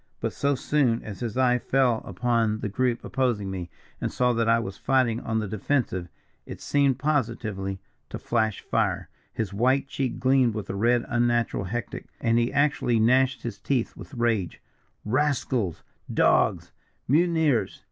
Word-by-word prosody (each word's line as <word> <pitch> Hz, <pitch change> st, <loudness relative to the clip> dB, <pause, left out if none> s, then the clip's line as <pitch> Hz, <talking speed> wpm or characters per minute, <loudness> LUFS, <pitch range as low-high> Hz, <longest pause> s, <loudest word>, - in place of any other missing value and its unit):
But -, -, -2 dB
so 140 Hz, 0 st, +1 dB
soon 130 Hz, -3 st, +1 dB
as 100 Hz, -3 st, -8 dB
his 120 Hz, -1 st, -4 dB
eye 125 Hz, -1 st, +3 dB
fell 125 Hz, -4 st, +2 dB
upon 115 Hz, -3 st, 0 dB
the 105 Hz, -, -2 dB
group 120 Hz, +3 st, -1 dB
opposing 120 Hz, -7 st, -1 dB
me, 90 Hz, -2 st, -5 dB, 0.3 s
and -, -, -1 dB
saw 125 Hz, 0 st, +2 dB
that 115 Hz, -1 st, +1 dB
I 115 Hz, -, +5 dB
was 100 Hz, -4 st, -4 dB
fighting 125 Hz, -3 st, +1 dB
on 110 Hz, -, -2 dB
the 110 Hz, -1 st, -1 dB
defensive, 100 Hz, -4 st, -1 dB, 0.4 s
it -, -, -8 dB
seemed 140 Hz, -3 st, +2 dB
positively 110 Hz, -9 st, -2 dB, 0.3 s
to -, -, -5 dB
flash 110 Hz, -3 st, -1 dB
fire -, -, -1 dB, 0.2 s
his 105 Hz, -3 st, -3 dB
white 130 Hz, +6 st, +2 dB
cheek 135 Hz, -2 st, -3 dB
gleamed 130 Hz, -3 st, +3 dB
with 105 Hz, -3 st, -4 dB
a -, -, -5 dB
red 120 Hz, +4 st, +2 dB
unnatural 120 Hz, -4 st, +1 dB
hectic 115 Hz, +3 st, -5 dB
and 115 Hz, 0 st, +2 dB
he 120 Hz, +1 st, 0 dB
actually 140 Hz, -5 st, +2 dB
gnashed 130 Hz, +3 st, +3 dB
his 115 Hz, -4 st, -5 dB
teeth 130 Hz, -5 st, -1 dB
with 140 Hz, -, -11 dB
rage. 115 Hz, -7 st, 0 dB, 0.5 s
'Rascals! 125 Hz, -, 0 dB, 0.3 s
Dogs! -, -, +2 dB, 0.4 s
Mutineers!' 155 Hz, -, +2 dB
120 Hz, 155 wpm, -26 LUFS, 110-130 Hz, 0.5 s, I